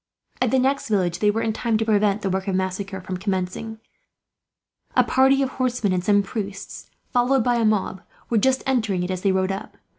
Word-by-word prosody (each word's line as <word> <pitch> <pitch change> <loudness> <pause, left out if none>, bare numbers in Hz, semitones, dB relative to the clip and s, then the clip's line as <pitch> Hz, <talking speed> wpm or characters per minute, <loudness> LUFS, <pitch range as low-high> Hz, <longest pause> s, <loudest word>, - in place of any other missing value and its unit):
At 255 - +3
the 265 - +2
next 270 0 +1
village 180 -5 +1
they 210 - +3
were 220 +2 0
in 220 - 0
time 230 0 0
to 225 - -1
prevent 210 -1 +2
the 195 - 0
work 190 +1 -2
of 190 - 0
massacre 190 +1 -3
from 185 0 -5
commencing. 190 +3 -3 1.2
A - - +6
party 270 +1 +3
of 265 - -1
horsemen 245 -7 0
and 180 -1 -1
some 205 +1 +3
priests, 200 -2 -6 0.2
followed 250 0 +3
by 245 0 +2
a 230 - +2
mob, 205 -3 0 0.3
were 230 - +2
just 265 +4 +2
entering 220 -9 0
it 180 - -3
as 185 -1 -3
they 195 - +2
rode 190 0 +1
up. 195 - -7
210 Hz, 210 wpm, -23 LUFS, 190-240 Hz, 1.2 s, A